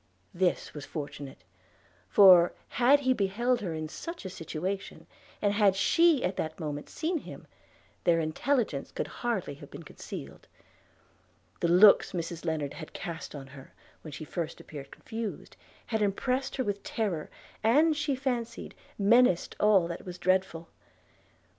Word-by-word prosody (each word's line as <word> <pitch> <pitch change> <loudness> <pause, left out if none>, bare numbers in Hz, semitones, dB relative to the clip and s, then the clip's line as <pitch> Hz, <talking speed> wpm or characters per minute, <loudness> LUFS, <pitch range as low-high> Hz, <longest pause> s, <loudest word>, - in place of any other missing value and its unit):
This 180 0 0
was 150 - -7
fortunate; 140 -2 -7 0.7
for, 180 -4 +7 0.2
had 270 +4 +4
he 260 -1 +3
beheld 235 +4 0
her 175 -5 -3
in 155 0 -4
such 335 - -8
a 190 - -5
situation, 180 +4 -5 0.4
and 205 -1 +3
had 205 -2 +4
she 330 - +4
at 180 +1 -2
that 160 +2 -3
moment 150 -3 -5
seen 330 +1 -2
him, - - -11 0.6
their 170 -2 +3
intelligence 165 - -1
could - - -3 0.2
hardly 230 -11 -1
have 140 - -12
been - - -10
concealed. - - -9 1.1
The - - +1
looks 190 +5 +6
Mrs 170 -1 -4
Lennard 155 -4 -2
had 155 - -9
cast 165 -2 -6
on 140 -2 -7
her, 135 0 -14 0.3
when 155 - -9
she 155 +3 -7
first 170 0 -4
appeared 140 -3 -9
confused, 225 +5 -7 0.3
had 220 -2 -2
impressed 255 +7 0
her 260 - 0
with 205 -3 -3
terror, 195 -10 -3 0.3
and, 300 +8 +4
she 295 -2 -1
fancied, 245 -3 -3 0.2
menaced 210 -2 +4
all 200 -5 +4
that 170 0 -6
was 180 -1 -8
dreadful. 185 -3 0
190 Hz, 145 wpm, -29 LUFS, 165-240 Hz, 1.1 s, for